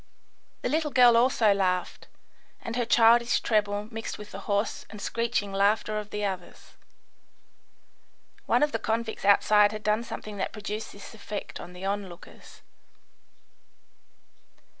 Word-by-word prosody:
The -, -, 0 dB
little 310 Hz, 0 st, 0 dB
girl 245 Hz, -3 st, +6 dB
also 230 Hz, -3 st, +4 dB
laughed, 185 Hz, -2 st, -1 dB, 0.5 s
and 230 Hz, -, -6 dB
her 240 Hz, -2 st, -1 dB
childish 235 Hz, +1 st, +5 dB
treble 210 Hz, -1 st, 0 dB
mixed 225 Hz, 0 st, -5 dB
with 210 Hz, 0 st, -11 dB
the 195 Hz, -, -7 dB
hoarse 205 Hz, +2 st, -1 dB
and 210 Hz, -, -10 dB
screeching 230 Hz, -2 st, -2 dB
laughter 210 Hz, +2 st, +1 dB
of 210 Hz, -1 st, -8 dB
the 210 Hz, 0 st, -3 dB
others. 185 Hz, -3 st, -6 dB, 1.8 s
One -, -, +3 dB
of 295 Hz, -, +1 dB
the -, -, -2 dB
convicts 225 Hz, -2 st, -3 dB
outside 205 Hz, +1 st, +5 dB
had 215 Hz, 0 st, -7 dB
done 215 Hz, +2 st, +1 dB
something 215 Hz, -3 st, -7 dB
that 190 Hz, -, -3 dB
produced 210 Hz, 0 st, -5 dB
this 200 Hz, -, -12 dB
effect 210 Hz, -1 st, -7 dB
on 180 Hz, -, -10 dB
the 180 Hz, +2 st, -8 dB
onlookers. 195 Hz, -3 st, -7 dB
210 Hz, 140 wpm, -27 LUFS, 200-230 Hz, 1.8 s, girl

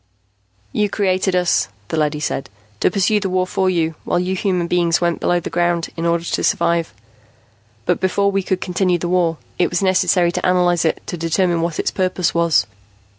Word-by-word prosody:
"You 210 Hz, -, 0 dB
created 190 Hz, -2 st, 0 dB
us," 180 Hz, -1 st, +2 dB, 0.2 s
the -, -, -2 dB
leady 150 Hz, -1 st, 0 dB
said, 145 Hz, -2 st, -3 dB, 0.3 s
"to -, -, +3 dB
pursue 200 Hz, +3 st, +2 dB
the 195 Hz, -2 st, -2 dB
war 185 Hz, 0 st, +1 dB
for 185 Hz, 0 st, 0 dB
you, 165 Hz, -3 st, 0 dB
while -, -, 0 dB
you 180 Hz, +1 st, -1 dB
human 185 Hz, -3 st, 0 dB
beings 170 Hz, -1 st, +1 dB
went 170 Hz, -1 st, 0 dB
below 175 Hz, -, +1 dB
the 170 Hz, -, -7 dB
ground 175 Hz, 0 st, 0 dB
in 165 Hz, 0 st, -2 dB
order 170 Hz, 0 st, +1 dB
to -, -, -2 dB
survive. 170 Hz, -1 st, +1 dB, 0.9 s
But -, -, +1 dB
before 200 Hz, +2 st, +1 dB
we 195 Hz, 0 st, 0 dB
could 185 Hz, 0 st, -2 dB
continue 180 Hz, 0 st, +1 dB
the 175 Hz, -, -3 dB
war, 175 Hz, -3 st, +1 dB, 0.2 s
it 180 Hz, -, +3 dB
was 175 Hz, +2 st, -1 dB
necessary 180 Hz, -2 st, +3 dB
to -, -, -3 dB
analyze 175 Hz, -2 st, +2 dB
it 160 Hz, -, 0 dB
to 175 Hz, -, -5 dB
determine 170 Hz, +1 st, +1 dB
what 165 Hz, -1 st, -2 dB
its -, -, -1 dB
purpose 185 Hz, -2 st, 0 dB
was. 170 Hz, -10 st, +2 dB
175 Hz, 195 wpm, -19 LUFS, 170-185 Hz, 0.9 s, to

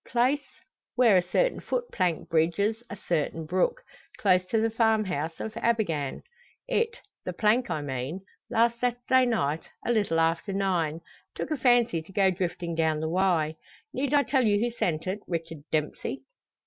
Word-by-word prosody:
Place 260 Hz, +4 st, +1 dB, 0.5 s
where 240 Hz, -5 st, +5 dB
a 180 Hz, -, +6 dB
certain -, -, +1 dB
foot 485 Hz, -1 st, -3 dB
plank 180 Hz, -4 st, 0 dB
bridges 185 Hz, +8 st, +1 dB
a -, -, -5 dB
certain 165 Hz, -3 st, -2 dB
brook, 185 Hz, -, 0 dB, 0.3 s
close 185 Hz, -3 st, +3 dB
to 225 Hz, -, +1 dB
the 225 Hz, +1 st, +1 dB
farmhouse 215 Hz, -9 st, 0 dB
of 220 Hz, -, -4 dB
Abergann. 170 Hz, -, -1 dB, 0.4 s
It 465 Hz, -1 st, 0 dB, 0.3 s
the 180 Hz, -, -4 dB
plank, 220 Hz, +5 st, +2 dB
I 155 Hz, -3 st, -2 dB
mean 135 Hz, +6 st, -4 dB, 0.3 s
last 235 Hz, +1 st, +2 dB
Saturday 250 Hz, +1 st, +2 dB
night, 160 Hz, -10 st, -1 dB, 0.2 s
a -, -, +1 dB
little 205 Hz, -8 st, +1 dB
after 165 Hz, +5 st, +1 dB
nine, 175 Hz, -5 st, 0 dB, 0.3 s
took -, -, -4 dB
a -, -, +2 dB
fancy 240 Hz, -, +3 dB
to 160 Hz, -, -15 dB
go 195 Hz, -1 st, +3 dB
drifting 175 Hz, -2 st, -3 dB
down 160 Hz, -1 st, +1 dB
the 160 Hz, 0 st, -2 dB
Wye. 165 Hz, -3 st, +1 dB, 0.4 s
Need 270 Hz, +2 st, -1 dB
I 285 Hz, -, +5 dB
tell 265 Hz, -2 st, +2 dB
you 205 Hz, -2 st, +3 dB
who 240 Hz, +2 st, 0 dB
sent 165 Hz, -9 st, -1 dB
it, 190 Hz, +3 st, -2 dB
Richard 165 Hz, -3 st, -4 dB
Dempsey?" 155 Hz, -1 st, -2 dB
195 Hz, 165 wpm, -27 LUFS, 165-235 Hz, 0.5 s, a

